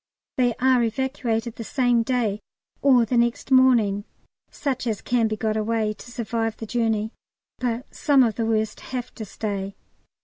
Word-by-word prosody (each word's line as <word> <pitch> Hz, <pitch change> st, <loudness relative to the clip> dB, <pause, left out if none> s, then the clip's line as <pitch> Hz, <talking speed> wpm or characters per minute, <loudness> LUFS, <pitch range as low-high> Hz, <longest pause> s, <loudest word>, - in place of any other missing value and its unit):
They 245 Hz, -3 st, +2 dB
are 255 Hz, -1 st, +3 dB
evacuated 235 Hz, -1 st, -2 dB
the 230 Hz, -, -5 dB
same 245 Hz, -1 st, +2 dB
day 230 Hz, -4 st, 0 dB, 0.4 s
or 255 Hz, -4 st, +5 dB
the 240 Hz, +2 st, 0 dB
next 235 Hz, +3 st, 0 dB
morning, 235 Hz, -6 st, +4 dB, 0.4 s
such 260 Hz, -4 st, -3 dB
as 220 Hz, -3 st, -1 dB
can 240 Hz, -2 st, +1 dB
be 215 Hz, 0 st, -3 dB
got 215 Hz, 0 st, -1 dB
away 220 Hz, 0 st, 0 dB
to 240 Hz, -, -13 dB
survive 225 Hz, -1 st, -2 dB
the 225 Hz, -, -6 dB
journey, 220 Hz, -1 st, 0 dB, 0.5 s
but 245 Hz, 0 st, -2 dB
some 280 Hz, -3 st, +4 dB
of 230 Hz, -3 st, +1 dB
the 225 Hz, +1 st, -2 dB
worst 220 Hz, -1 st, 0 dB
have 250 Hz, -2 st, -6 dB
to 220 Hz, -, -7 dB
stay. 200 Hz, -1 st, -4 dB
230 Hz, 165 wpm, -24 LUFS, 220-250 Hz, 0.5 s, or